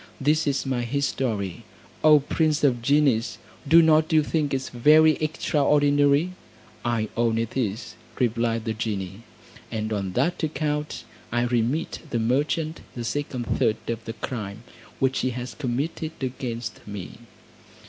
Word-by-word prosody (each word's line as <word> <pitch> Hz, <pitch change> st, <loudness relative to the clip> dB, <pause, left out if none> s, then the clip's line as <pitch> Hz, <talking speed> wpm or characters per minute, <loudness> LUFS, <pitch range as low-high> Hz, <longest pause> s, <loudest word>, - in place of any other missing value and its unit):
This 150 Hz, +3 st, +2 dB
is 140 Hz, -1 st, 0 dB
my 130 Hz, -2 st, -1 dB
history, 120 Hz, -7 st, -2 dB, 0.4 s
O 155 Hz, -1 st, +7 dB
prince 155 Hz, +1 st, 0 dB
of 125 Hz, -4 st, +3 dB
genies! 135 Hz, -3 st, +2 dB, 0.3 s
do 165 Hz, +3 st, +7 dB
not 155 Hz, 0 st, +4 dB
you 155 Hz, -1 st, +5 dB
think 150 Hz, -1 st, -1 dB
it 135 Hz, 0 st, -2 dB
very 155 Hz, +6 st, +6 dB
extraordinary?" 145 Hz, 0 st, +2 dB, 0.5 s
"I 115 Hz, -3 st, 0 dB
own 115 Hz, -1 st, +1 dB
it 115 Hz, 0 st, -2 dB
is," 115 Hz, -3 st, -2 dB, 0.2 s
replied 115 Hz, -2 st, 0 dB
the 110 Hz, -, -1 dB
genie, 100 Hz, -2 st, -4 dB, 0.5 s
"and 110 Hz, 0 st, -2 dB
on 100 Hz, -3 st, -2 dB
that 175 Hz, -, 0 dB
account 150 Hz, -1 st, -2 dB, 0.3 s
I 120 Hz, 0 st, +1 dB
remit 120 Hz, +6 st, 0 dB
the 120 Hz, -, -1 dB
merchant 150 Hz, +7 st, 0 dB
the 120 Hz, -, -4 dB
second 130 Hz, 0 st, -3 dB
third 110 Hz, -1 st, +1 dB
of 115 Hz, -1 st, -3 dB
the 115 Hz, -, -4 dB
crime 110 Hz, -3 st, -6 dB, 0.3 s
which 135 Hz, 0 st, +1 dB
he 130 Hz, -, 0 dB
has 125 Hz, 0 st, -5 dB
committed 150 Hz, +4 st, -3 dB
against 120 Hz, -4 st, -4 dB
me." 100 Hz, -1 st, -7 dB
130 Hz, 140 wpm, -25 LUFS, 115-150 Hz, 0.5 s, O